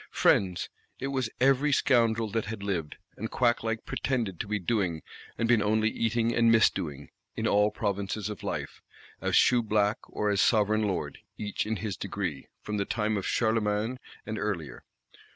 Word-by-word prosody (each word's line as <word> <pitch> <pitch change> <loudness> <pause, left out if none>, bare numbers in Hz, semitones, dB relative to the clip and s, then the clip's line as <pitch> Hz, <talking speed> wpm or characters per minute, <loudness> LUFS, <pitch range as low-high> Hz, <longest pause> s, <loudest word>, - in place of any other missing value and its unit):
Friends! 90 -3 +2 0.3
it 135 - -3
was 130 -4 -1
every 135 +3 +3
scoundrel 115 -5 +3
that 115 0 -1
had 105 -1 -6
lived, 85 -7 -2 0.2
and 110 +2 -4
quack 120 -2 +2
like 115 0 -3
pretended 115 -9 -2
to - - -3
be 105 0 0
doing, 90 -5 -1 0.3
and 115 - 0
been 115 -2 +4
only 110 +1 +2
eating 115 0 0
and 115 -1 +4
_mis_doing, 85 -10 +2 0.3
in - - -2
all 105 +1 +4
provinces 100 -1 -2
of 105 -2 -6
life, - - -4 0.4
as - - 0
Shoeblack 110 -2 +3
or 105 -1 -1
as 100 - +2
Sovereign 110 -1 +3
Lord, 95 - -3 0.2
each 105 0 -3
in 110 - 0
his 105 -1 -4
degree, 95 -7 -4 0.2
from 105 0 -3
the 100 - 0
time 110 0 -1
of 100 - -2
Charlemagne 110 +1 0 0.3
and 110 -1 -4
earlier. 85 -9 -4
110 Hz, 170 wpm, -28 LUFS, 100-115 Hz, 0.4 s, been